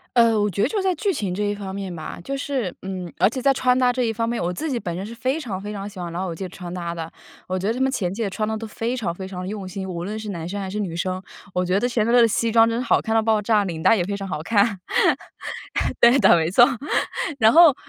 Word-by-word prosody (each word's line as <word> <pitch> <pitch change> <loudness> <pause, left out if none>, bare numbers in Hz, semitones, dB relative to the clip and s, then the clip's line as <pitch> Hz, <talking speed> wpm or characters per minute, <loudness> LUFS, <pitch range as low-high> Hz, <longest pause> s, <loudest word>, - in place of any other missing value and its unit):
呃， 230 -3 +5
我 205 - +2
觉 200 +2 -1
得 - - +3
就 410 - -1
在 380 -1 +1
剧 390 +4 0
情 200 - -2
这 210 - -2
一 205 - -1
方 195 -1 -6
面 195 -3 -5
吧， 155 0 -7
就 275 +9 -3
是， 265 -9 -2
嗯 185 -2 -5
而 - - +5
且 250 +3 -5
在 275 - +5
穿 255 -1 +2
搭 250 -1 +3
这 250 -1 0
一 225 - 0
方 230 +1 -1
面， 235 0 -1
我 175 +1 -1
自 310 - -3
己 250 - 0
本 175 -6 -4
身 190 - -4
是 225 - -7
非 255 +6 -1
常 200 -10 -4
非 205 +1 -6
常 200 -1 -5
喜 200 -2 -12
欢 170 -1 -5
老 185 +2 -3
友 170 - -4
记 175 - -6
的 185 - -5
穿 175 -1 -8
搭 170 -1 -4
的。 165 -1 -6 0.4
我 185 - -1
觉 190 - -3
得 225 - +1
他 255 - -5
们 265 - +3
前 190 -8 -2
几 230 - -3
季 200 - -1
穿 215 +2 -2
得 220 - -1
都 225 - -6
非 225 +3 -3
常 200 -9 -2
非 190 +2 -7
常 190 -1 -6
的 185 - -5
用 200 -3 -5
心， 190 0 -5
无 175 -1 -4
论 210 +3 -4
是 215 -1 -6
男 170 -2 -5
生 200 +2 -4
还 190 - -4
是 210 - -4
女 190 -5 -3
生， 185 +2 -2 0.3
我 180 0 0
觉 185 +3 +1
得 245 - +1
钱 230 -3 +1
德 235 - +1
勒 245 - +6
的 230 - +5
西 225 +1 0
装 225 0 +6
真 230 - -1
的 - - -1
是 - - -8
好 - - +4
看 220 - -3
到 225 - +4
爆 220 -1 +2
炸， 210 -1 +3
领 165 -4 -4
带 225 - +5
也 175 - 0
非 200 +2 -3
常 195 -1 -5
好 180 -4 -3
看。 200 +3 +2 1.2
对 235 +2 +7
的， - - +7
没 160 0 +1
错， 240 +6 +7 0.8
然 220 0 +6
后 330 -3 +8
205 Hz, 340 characters per minute, -23 LUFS, 185-235 Hz, 1.2 s, 后